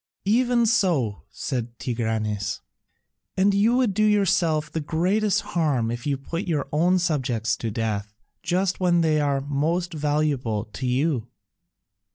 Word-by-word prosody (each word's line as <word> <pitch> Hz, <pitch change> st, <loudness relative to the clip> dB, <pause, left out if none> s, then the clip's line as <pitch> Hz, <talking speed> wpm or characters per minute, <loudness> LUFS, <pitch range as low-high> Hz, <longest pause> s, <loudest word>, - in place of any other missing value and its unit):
"Even 240 Hz, +3 st, +3 dB
so," 170 Hz, -, +1 dB
said 120 Hz, -2 st, -4 dB
Tigranes, 110 Hz, -4 st, -2 dB, 0.8 s
"and 195 Hz, +2 st, +4 dB
you 215 Hz, +5 st, +3 dB
will 255 Hz, 0 st, +3 dB
do 210 Hz, -1 st, -1 dB
yourself 185 Hz, -7 st, +2 dB
the 160 Hz, -, -2 dB
greatest 185 Hz, +7 st, +1 dB
harm 140 Hz, -9 st, +1 dB
if 120 Hz, +3 st, -5 dB
you 140 Hz, -2 st, 0 dB
put 165 Hz, +7 st, -5 dB
your 155 Hz, -4 st, -1 dB
own 175 Hz, +5 st, +3 dB
subjects 130 Hz, -, 0 dB
to 115 Hz, -, -3 dB
death 105 Hz, -2 st, -2 dB, 0.3 s
just 185 Hz, +1 st, 0 dB
when 175 Hz, -2 st, +3 dB
they 155 Hz, -2 st, +2 dB
are 140 Hz, -2 st, +1 dB
most 160 Hz, +6 st, -1 dB
valuable 145 Hz, -8 st, 0 dB
to 110 Hz, +5 st, -5 dB
you." 130 Hz, -1 st, 0 dB
150 Hz, 140 wpm, -24 LUFS, 120-185 Hz, 0.8 s, and